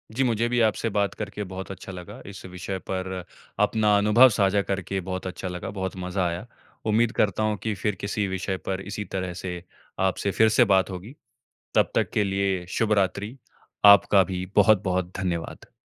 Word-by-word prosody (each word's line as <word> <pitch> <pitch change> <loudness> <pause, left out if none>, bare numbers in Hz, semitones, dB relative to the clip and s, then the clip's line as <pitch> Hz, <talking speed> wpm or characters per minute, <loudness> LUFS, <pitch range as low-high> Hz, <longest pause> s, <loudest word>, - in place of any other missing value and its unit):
जी, 135 - +2
मुझे 120 -1 +1
भी 120 0 +1
आपसे 115 +2 -2
बात 100 -1 0
करके 105 -1 -5
बहुत 95 +1 -6
अच्छा 95 - -8
लगा। 95 +6 -9
इस 95 - -10
विषय 95 +1 -5
पर 95 0 -2 0.5
अपना 105 -2 +3
अनुभव 105 +5 +6
साझा 100 0 +3
करके 95 0 -3
बहुत 95 +1 -4
अच्छा 95 0 -5
लगा, 90 +2 -5
बहुत 95 -1 -4
मज़ा 90 +1 -2
आया। 85 +5 -4 0.4
उम्मीद 115 +2 +3
करता 110 +1 +1
हूँ 105 -1 0
कि 110 -1 -1
फिर 105 -3 0
किसी 100 0 -1
विषय 95 0 -2
पर 95 0 -2
इसी 100 +1 -5
तरह 90 -1 -2
से 90 -2 -5 0.4
आपसे 100 +1 -1
फिर 110 +2 +4
से 120 +3 +5
बात 95 -2 +3
होगी, 95 +8 -8 0.6
तब - - +3
तक - - +1
के 105 - +2
लिए 95 -2 0
शुभ 110 -2 +2
रात्रि। 100 +6 -1 0.5
आपका 100 -1 +7
भी 90 0 -4
बहुत-बहुत 95 -3 +3
धन्यवाद। 85 -3 -4
100 Hz, 180 wpm, -25 LUFS, 95-105 Hz, 0.6 s, आपका